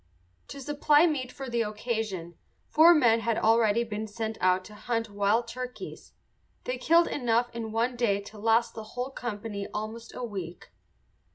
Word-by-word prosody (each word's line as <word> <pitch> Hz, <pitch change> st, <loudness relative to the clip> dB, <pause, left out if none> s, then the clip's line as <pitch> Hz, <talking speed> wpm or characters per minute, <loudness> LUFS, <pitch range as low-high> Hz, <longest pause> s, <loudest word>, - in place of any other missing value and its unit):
To 280 Hz, -, -8 dB
supply 295 Hz, +3 st, +3 dB
meat 270 Hz, -6 st, -1 dB
for 270 Hz, -1 st, -7 dB
the 235 Hz, -1 st, 0 dB
occasion 210 Hz, -5 st, -3 dB, 0.3 s
four 330 Hz, +3 st, +6 dB
men 235 Hz, -6 st, +4 dB
had 230 Hz, 0 st, 0 dB
already 225 Hz, 0 st, +3 dB
been 220 Hz, -1 st, -4 dB
sent 220 Hz, +1 st, -4 dB
out 185 Hz, 0 st, +2 dB
to 210 Hz, -, -12 dB
hunt 225 Hz, +1 st, -3 dB
wild 205 Hz, +4 st, +1 dB
turkeys. 250 Hz, +1 st, -8 dB, 0.5 s
They -, -, -3 dB
killed 335 Hz, +1 st, +4 dB
enough 240 Hz, -2 st, 0 dB
in 225 Hz, -2 st, -5 dB
one 235 Hz, +3 st, 0 dB
day 210 Hz, -5 st, +2 dB
to 210 Hz, +1 st, -12 dB
last 225 Hz, +2 st, +2 dB
the 220 Hz, -, -7 dB
whole 250 Hz, +2 st, -2 dB
company 210 Hz, -5 st, -5 dB
almost 220 Hz, +2 st, -6 dB
a 250 Hz, -, -5 dB
week. 185 Hz, -7 st, -7 dB
230 Hz, 165 wpm, -28 LUFS, 210-250 Hz, 0.5 s, four